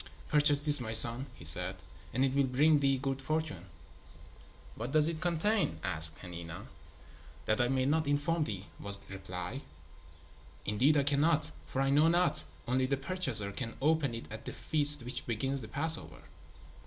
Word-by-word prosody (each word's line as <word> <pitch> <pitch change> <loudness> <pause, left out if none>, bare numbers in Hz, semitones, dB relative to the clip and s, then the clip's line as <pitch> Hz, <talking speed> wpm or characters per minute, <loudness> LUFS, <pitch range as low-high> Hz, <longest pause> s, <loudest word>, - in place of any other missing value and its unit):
"Purchase 145 -1 +4
this, 145 -1 +5
my 115 -2 -5
son," 115 +4 +5
he 80 - -11
said, 90 +4 +1 0.4
"and 130 +4 +1
it 135 - -1
will 140 -1 +2
bring 145 +4 +3
thee 135 -1 +1
good 135 0 -3
fortune." 140 - -3 1.1
"What 120 +3 -6
does 155 0 +5
it 165 -1 -4
contain?" 175 - 0
asked 80 -3 0
Hanina. 85 -2 -8 0.8
"That 110 +3 +1
I 120 - +2
may 130 0 0
not 155 +2 0
inform 150 +3 0
thee," 100 -5 -6
was 100 0 0
the 95 - -13
reply. 90 - -6 1.0
"Indeed 130 +9 +2
I 140 - +2
cannot, 150 +2 +1 0.2
for 135 - -3
I 135 - 0
know 150 +3 +4
not. 175 - +1 0.2
Only 130 +1 0
the 140 +1 -1
purchaser 135 - +3
can 115 +2 -6
open 145 -4 +1
it 115 - -7
at 110 0 -9
the - - -6
feast 145 -3 +2
which 125 - -4
begins 135 +4 -1
the 110 - -8
Passover." 155 +8 +1
135 Hz, 170 wpm, -31 LUFS, 110-150 Hz, 1.1 s, this